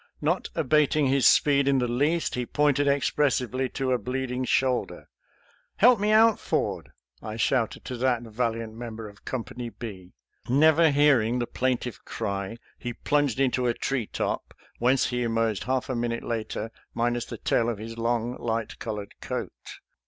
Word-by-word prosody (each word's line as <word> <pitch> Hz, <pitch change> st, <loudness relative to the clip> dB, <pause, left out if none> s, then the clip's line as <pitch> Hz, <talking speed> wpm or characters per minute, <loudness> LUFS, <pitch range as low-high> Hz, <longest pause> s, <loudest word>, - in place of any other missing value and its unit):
Not -, -, 0 dB
abating 150 Hz, +1 st, +3 dB
his 135 Hz, -2 st, +4 dB
speed 140 Hz, -1 st, +4 dB
in 140 Hz, -1 st, +4 dB
the 125 Hz, -1 st, +1 dB
least, 145 Hz, +8 st, 0 dB
he 125 Hz, -1 st, -2 dB
pointed 145 Hz, -1 st, +2 dB
expressively 130 Hz, -2 st, +1 dB
to 135 Hz, -2 st, 0 dB
a 125 Hz, -, +2 dB
bleeding 130 Hz, +2 st, -3 dB
shoulder. 130 Hz, -1 st, 0 dB, 0.4 s
" -, -, -36 dB
Help 240 Hz, 0 st, +6 dB
me 210 Hz, +1 st, +1 dB
out. 220 Hz, 0 st, +5 dB
Ford! -, -, -2 dB, 0.2 s
" -, -, -67 dB
I 110 Hz, -1 st, -6 dB
shouted 115 Hz, 0 st, 0 dB
to 125 Hz, -1 st, -5 dB
that 125 Hz, -1 st, +1 dB
val 115 Hz, +1 st, -1 dB
iant 115 Hz, -1 st, -6 dB
member 115 Hz, -1 st, -7 dB
of 100 Hz, -1 st, -16 dB
Company 125 Hz, -1 st, -5 dB
B. 95 Hz, -6 st, -9 dB, 0.3 s
Never 155 Hz, +5 st, +5 dB
hearing 140 Hz, -5 st, +3 dB
the 120 Hz, -, 0 dB
plaintive 125 Hz, -2 st, -2 dB
cry, 100 Hz, +2 st, -4 dB, 0.2 s
he 120 Hz, -1 st, -4 dB
plunged 145 Hz, -2 st, 0 dB
into 125 Hz, -2 st, +2 dB
a 120 Hz, -, +1 dB
tree 130 Hz, -6 st, -2 dB
top, -, -, -3 dB, 0.2 s
whence 125 Hz, +2 st, +3 dB
he 125 Hz, -1 st, -1 dB
emerged 115 Hz, -3 st, 0 dB
half 130 Hz, 0 st, 0 dB
a 130 Hz, -, -2 dB
minute 120 Hz, 0 st, -2 dB
later 110 Hz, -1 st, -3 dB, 0.2 s
minus 120 Hz, 0 st, 0 dB
the -, -, -7 dB
tail 115 Hz, 0 st, +1 dB
of 115 Hz, -, -2 dB
his 115 Hz, +2 st, -7 dB
long, 115 Hz, +1 st, -1 dB
light 115 Hz, -1 st, -3 dB
colored 105 Hz, -3 st, -5 dB
coat. -, -, -6 dB
125 Hz, 170 wpm, -26 LUFS, 115-135 Hz, 0.4 s, Help